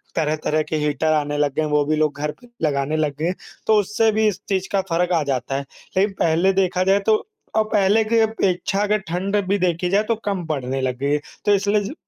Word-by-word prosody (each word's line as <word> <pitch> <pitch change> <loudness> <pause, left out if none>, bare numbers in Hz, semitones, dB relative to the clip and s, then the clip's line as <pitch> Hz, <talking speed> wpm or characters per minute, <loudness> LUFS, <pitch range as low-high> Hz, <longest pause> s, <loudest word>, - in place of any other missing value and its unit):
तरह-तरह 155 0 0
के - - -1
हीटर 155 +2 0
आने 145 -1 0
लग 145 -2 0
गए - - +1
हैं, 155 - -1
वो 150 -1 +2
भी 155 +1 +1
लोग 150 -2 0
घर 150 0 -1
पे 245 - -16 0.2
लगाने 145 +1 0
लग 150 -3 0
गए 160 - -1
हैं, 180 +2 0 0.3
तो 220 - +5
उससे 210 +3 +2
भी 215 0 +2
इस 200 -1 -2
चीज़ 190 -1 0
का 195 -1 +2
फ़र्क 175 +2 +1
आ 160 -3 +2
जाता 135 -1 -2
है। 140 0 -3 0.3
लेकिन 195 +1 +2
पहले 170 +4 +3
देखा 185 -1 +1
जाए 195 +2 +3
तो 220 -1 +3 0.3
और 220 - +4
पहले 210 +1 +3
की 230 +2 +1
अपेक्षा 200 -3 0
अगर 210 +1 +2
ठंड 190 +4 -2
भी 200 +1 +2
देखी 175 0 0
जाए 205 +3 +3
तो 230 - +2
कम 195 -4 -2
पड़ने 135 -3 -2
लग 125 -1 -1
गई 140 +1 -1
है। 150 - +2 0.3
तो 205 - +4
इसलिए 205 +1 +1
जो 205 - -5
180 Hz, 245 wpm, -21 LUFS, 150-200 Hz, 0.3 s, तो